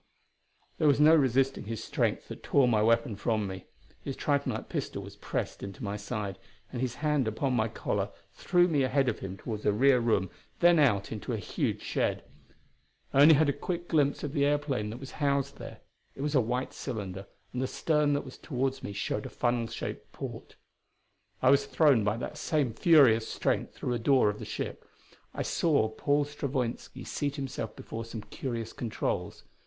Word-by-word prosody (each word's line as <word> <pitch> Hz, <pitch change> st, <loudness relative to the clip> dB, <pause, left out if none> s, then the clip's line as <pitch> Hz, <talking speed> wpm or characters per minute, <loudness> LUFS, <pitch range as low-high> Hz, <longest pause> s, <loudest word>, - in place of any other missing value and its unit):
There 155 Hz, -, +3 dB
was 145 Hz, -1 st, +4 dB
no 155 Hz, +2 st, +7 dB
resisting 135 Hz, -4 st, +2 dB
his 115 Hz, 0 st, -4 dB
strength -, -, -1 dB
that -, -, -8 dB
tore 140 Hz, -3 st, +3 dB
my 110 Hz, -3 st, +3 dB
weapon 115 Hz, 0 st, +2 dB
from 110 Hz, +1 st, 0 dB
me. 95 Hz, -1 st, -6 dB, 0.4 s
His 135 Hz, -, -5 dB
tritonite 140 Hz, -1 st, -1 dB
pistol -, -, -4 dB
was -, -, -10 dB
pressed -, -, -4 dB
into 100 Hz, +7 st, -7 dB
my 100 Hz, 0 st, -2 dB
side, 105 Hz, -2 st, -4 dB, 0.3 s
and 125 Hz, -, -4 dB
his 125 Hz, -2 st, -1 dB
hand 150 Hz, -5 st, +2 dB
upon 125 Hz, +5 st, -1 dB
my 115 Hz, -3 st, +2 dB
collar 110 Hz, -, -2 dB, 0.2 s
threw 175 Hz, 0 st, +3 dB
me 150 Hz, -5 st, +2 dB
ahead 135 Hz, +1 st, +2 dB
of 110 Hz, -, -3 dB
him 95 Hz, 0 st, -6 dB
toward 105 Hz, -1 st, -5 dB
a 105 Hz, -, +3 dB
rear 130 Hz, +5 st, +4 dB
room, 105 Hz, -6 st, +1 dB, 0.3 s
then 175 Hz, -1 st, +6 dB
out 110 Hz, -9 st, +3 dB
into 110 Hz, -3 st, -4 dB
a -, -, -1 dB
huge -, -, -2 dB
shed. -, -, -1 dB, 0.9 s
I 135 Hz, -, +3 dB
had 155 Hz, 0 st, +8 dB
only 150 Hz, -1 st, +4 dB
a -, -, -5 dB
quick 175 Hz, -1 st, -4 dB
glimpse 145 Hz, -3 st, +2 dB
of 145 Hz, -1 st, -3 dB
the 145 Hz, -3 st, +2 dB
airplane 145 Hz, -7 st, 0 dB
that 110 Hz, -, -6 dB
was 135 Hz, 0 st, -9 dB
housed 140 Hz, -1 st, 0 dB
there. -, -, -9 dB, 0.3 s
It -, -, -7 dB
was 150 Hz, 0 st, -1 dB
a 135 Hz, -, +5 dB
white 125 Hz, +3 st, -2 dB
cylinder, 100 Hz, -6 st, -5 dB, 0.3 s
and 125 Hz, -, -2 dB
the 130 Hz, -, 0 dB
stern 150 Hz, -1 st, +1 dB
that 145 Hz, -, -1 dB
was 130 Hz, -, -11 dB
toward 135 Hz, -2 st, -2 dB
me 100 Hz, -, -5 dB
showed 100 Hz, +1 st, -2 dB
a -, -, -9 dB
funnel 120 Hz, -1 st, 0 dB
shaped 115 Hz, -, -6 dB
port. -, -, -7 dB, 0.9 s
I 130 Hz, -, +6 dB
was 140 Hz, -, +3 dB
thrown 140 Hz, -9 st, +4 dB
by 105 Hz, +2 st, 0 dB
that 150 Hz, +5 st, -6 dB
same 150 Hz, -6 st, 0 dB
furious 125 Hz, -8 st, +5 dB
strength -, -, -1 dB
through 125 Hz, -, -2 dB
a 120 Hz, -, -1 dB
door 130 Hz, -2 st, +4 dB
of 105 Hz, -, -10 dB
the -, -, -6 dB
ship; -, -, -5 dB, 0.5 s
I -, -, -1 dB
saw 145 Hz, -10 st, +2 dB
Paul 145 Hz, +6 st, +1 dB
Stravoinski 135 Hz, -4 st, -4 dB
seat 145 Hz, -1 st, -2 dB
himself 135 Hz, -6 st, -4 dB
before 115 Hz, 0 st, -6 dB
some 115 Hz, -1 st, -7 dB
curious 115 Hz, -4 st, -5 dB
controls. 115 Hz, -3 st, -3 dB
130 Hz, 190 wpm, -29 LUFS, 110-145 Hz, 0.9 s, had